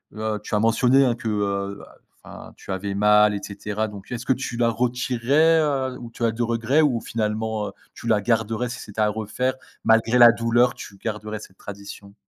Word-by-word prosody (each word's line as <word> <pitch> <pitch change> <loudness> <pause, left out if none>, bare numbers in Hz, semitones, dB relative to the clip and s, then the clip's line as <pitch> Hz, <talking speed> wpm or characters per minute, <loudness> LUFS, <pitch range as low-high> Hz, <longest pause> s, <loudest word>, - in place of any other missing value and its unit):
heu, 110 0 -2
tu 105 - -3
as - - +2
mentionné, 125 +5 +4
hein, 125 -3 +2
que, 115 - -7
heu, 100 -2 -1
bah, - - -15 0.3
enfin, - - -11
tu - - -9
avais 95 +1 -3
mal, 105 +1 +5
et 100 - -2
cetera. 105 +1 -3
Donc 100 -1 -11
est-ce 120 - -5
que - - +1
tu 130 -1 -5
la 120 0 +2
retirerais, 125 +6 +2
heu, 135 -4 -1
ou 120 - -9
tu 115 - -7
as 115 - +3
de 110 +2 -5
regret 120 +5 +2
ou 130 -7 +1
finalement, 110 -1 -2
heu, - - -7 0.2
tu - - -9
la 110 -3 +3
garderais, 115 +2 0
si 125 - -6
c'était 105 +1 -5
à 105 - +3
refaire? 110 +5 -2 0.3
Malgré 115 +2 +3
la 120 -1 +9
douleur, 120 +1 +2
tu 100 - -10
garderais 105 +1 -5
cette 95 -2 -14
tradition? 100 0 -10
110 Hz, 210 wpm, -23 LUFS, 105-120 Hz, 0.3 s, la